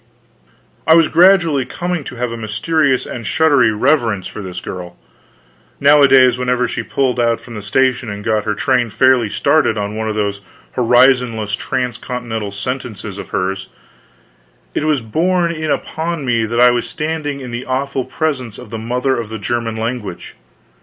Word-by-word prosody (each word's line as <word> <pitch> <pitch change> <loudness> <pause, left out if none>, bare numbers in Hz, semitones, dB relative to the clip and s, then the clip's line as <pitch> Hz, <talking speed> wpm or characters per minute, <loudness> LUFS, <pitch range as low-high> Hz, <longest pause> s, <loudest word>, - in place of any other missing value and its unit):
I 160 - +7
was 165 -2 +4
gradually 170 -6 +4
coming 175 +4 -3
to - - -7
have 125 -1 -2
a - - -4
mysterious 130 +6 0
and 120 - -6
shuddery 140 -2 +3
reverence 110 -4 +1
for 105 - -7
this 90 -2 -6
girl; 90 -1 -8 0.8
nowadays 135 -3 +6
whenever 125 0 +1
she - - -3
pulled 130 -2 -1
out 115 -1 +2
from 120 - -12
the 105 - -6
station 125 +3 +1
and 105 0 -6
got 110 -1 0
her 105 -1 -1
train 125 +1 +1
fairly 120 +1 +3
started 120 +1 +2
on 105 0 -3
one 110 0 -2
of 105 - -3
those 100 -1 -2 0.3
horizonless 120 -3 +3
transcontinental 120 -4 -4
sentences 105 -2 -5
of - - -8
hers, 95 +1 -2 1.1
it - - -1
was 150 -4 +1
borne 170 +9 +1
in 155 -2 -4
upon 160 +1 -2
me 115 -3 +1
that 115 +2 -2
I 125 0 +7
was 120 0 -2
standing 150 -2 -3
in 125 -2 -7
the 120 +2 -5
awful 135 +1 -1
presence 130 -9 -3
of 125 -4 -11
the 115 - -4
Mother 125 +4 0
of 115 -3 -4
the 110 - -5
German 115 -1 -2
Language. 110 -5 -5
125 Hz, 165 wpm, -17 LUFS, 110-140 Hz, 1.1 s, I